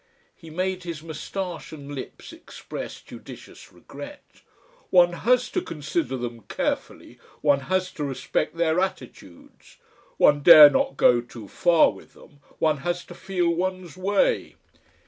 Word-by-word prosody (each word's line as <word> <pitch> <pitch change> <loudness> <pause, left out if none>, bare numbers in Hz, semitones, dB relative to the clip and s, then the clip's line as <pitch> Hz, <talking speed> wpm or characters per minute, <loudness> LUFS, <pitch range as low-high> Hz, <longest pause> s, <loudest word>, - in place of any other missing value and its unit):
He 165 - -14
made 185 +3 -3
his 170 -3 -7
moustache 165 +2 -6
and 145 -2 -9
lips 135 - -9
express 330 - -9
judicious - - -13
regret. - - -13 0.5
"One 175 -1 +5
has 245 +6 +1
to 365 - -1
consider 150 - -3
them 120 -1 -6
carefully, - - -4 0.2
one 145 -2 +3
has 185 0 0
to 150 - -6
respect 140 +4 -3
their 165 0 +1
attitudes. 125 - -7 0.4
One 145 0 +4
dare 155 -2 +10
not 135 - 0
go 120 -1 +4
too 120 -3 -12
far 170 - +3
with - - -16
them. 145 -3 -19 0.2
One 155 -2 +1
has 175 +5 -3
to - - -11
feel 185 -2 -2
one's 185 -1 -4
way." 205 - 0
165 Hz, 140 wpm, -24 LUFS, 145-185 Hz, 0.5 s, dare